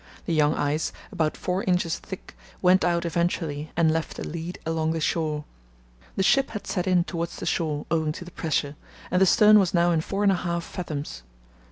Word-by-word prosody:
The 170 - -1
young 150 -1 +3
ice, 145 +2 0 0.2
about 160 -6 -1
four 185 +2 -1
inches 180 -3 +1
thick, 190 - -9 0.2
went 185 +1 +4
out 170 -1 +1
eventually 165 -3 -1
and 165 -2 +4
left 160 0 -2
a - - -4
lead 170 +2 -5
along 160 0 0
the 165 - -2
shore. 155 -2 -1 0.7
The 195 - +1
ship 275 +7 +3
had 210 - -6
set 180 -2 -2
in 180 -2 +4
towards 170 -1 -4
the - - -6
shore, 150 -3 -1
owing 160 -2 +1
to 175 - -8
the 175 - -11
pressure, 150 -3 -1 0.4
and 180 - +2
the 190 - +6
stern 210 +3 +7
was 190 -2 +1
now 175 0 +4
in 165 -2 +2
four 195 +5 -2
and 200 - +5
a - - +2
half 170 -1 -2
fathoms. 145 - -5
170 Hz, 205 wpm, -25 LUFS, 155-180 Hz, 0.7 s, stern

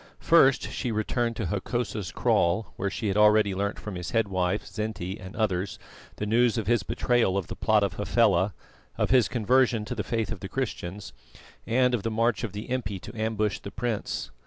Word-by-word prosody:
First 135 -5 +4
she 125 - -2
returned 115 +2 -1
to 110 - -3
Hokosa's 105 +1 -2
kraal, 85 +2 +1
where 100 - -2
she 105 +2 -3
had 100 - 0
already 105 -1 +5
learnt 100 +2 -2
from 105 - -7
his 90 -1 -5
head 115 -3 +1
wife, 95 +1 0
Zinti, 105 -3 -4
and 95 +2 -9
others 100 -4 -1 0.4
the 105 - -3
news 115 +2 +3
of 110 - -1
his 120 +1 +2
betrayal 115 -2 +1
of 100 - -1
the - - -7
plot - - +3
of - - 0
Hafela, 95 +2 +2 0.4
of - - 0
his 125 -3 +5
conversion 120 -1 +2
to - - -4
the - - -3
faith 115 -2 -2
of 110 - -5
the 95 - -7
Christians, 105 - -4 0.5
and 125 +1 +3
of 120 - +1
the 115 - -2
march 115 +2 +1
of 115 - -2
the 105 +2 -7
impi 105 -6 -2
to 115 - -10
ambush 110 -1 -1
the 100 - -8
prince. 115 0 -3
105 Hz, 200 wpm, -27 LUFS, 100-120 Hz, 0.5 s, already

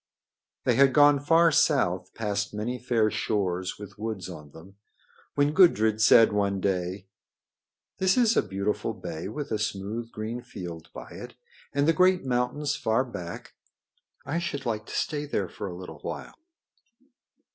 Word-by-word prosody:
They - - +2
had 135 -1 +5
gone 145 0 +6
far 165 +3 +4
south, - - +1
past 105 -1 -2
many 120 +4 -3
fair 115 -3 +1
shores 95 -5 -1
with 100 0 -11
woods 110 -4 -4
on 75 -4 -10
them, 90 +6 -15 0.6
when 145 +1 +2
Gudrid 110 - +4
said 115 0 +6
one 100 -1 0
day: 95 0 -2 0.9
"This 190 +2 +3
is 235 -2 +4
a - - +5
beautiful 100 +2 -2
bay 80 +3 -6
with 140 +6 -6
a 110 - 0
smooth, 110 +2 -3
green 110 +3 -5
field 85 -8 -8
by - - -10
it, - - -9 0.4
and 140 +1 +1
the 165 - +5
great 185 0 +3
mountains 130 +4 0
far 110 +4 +1
back. 90 -8 -8 0.7
I 165 +3 -1
should 145 -5 -4
like 110 -2 -2
to - - -7
stay 150 -1 -2
there 100 -9 -1
for 100 - -7
a 90 - -6
little 85 -4 -9
while." - - -6
110 Hz, 155 wpm, -27 LUFS, 100-140 Hz, 0.9 s, gone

